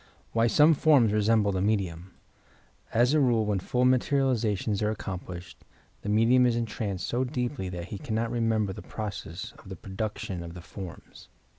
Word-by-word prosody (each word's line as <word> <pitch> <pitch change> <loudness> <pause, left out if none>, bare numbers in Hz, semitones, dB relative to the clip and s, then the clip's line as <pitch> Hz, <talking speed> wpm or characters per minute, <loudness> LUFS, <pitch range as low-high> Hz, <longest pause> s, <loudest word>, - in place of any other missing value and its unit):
' - - -32
' - - -34
WHY 115 0 +3
SOME 150 +6 +6
FORMS 135 -8 +4
RESHUBLE 105 -1 +3
THE 95 -1 -1
MEDIUM 95 -4 -1 0.8
As 120 +4 +3
a 155 - +4
rule, 120 -5 +3
when 105 -2 0
full 125 +7 0
materializations 120 -6 +1
are 105 - +2
accomplished 95 -4 -6 0.4
the 105 - -4
medium 120 +4 +4
is 120 - +1
entranced 105 -5 -3
so 120 +3 0
deeply 125 -6 -3
that 90 -1 -6
he 100 - -6
cannot 115 -3 -2
re 120 - -1
member 110 -4 +1
the - - -8
process 110 0 -6
of 95 - -14
the 95 - -6
production 95 0 -5
of 85 0 -8
the 90 - -8
forms. 90 +1 -10
110 Hz, 180 wpm, -28 LUFS, 95-120 Hz, 0.8 s, SOME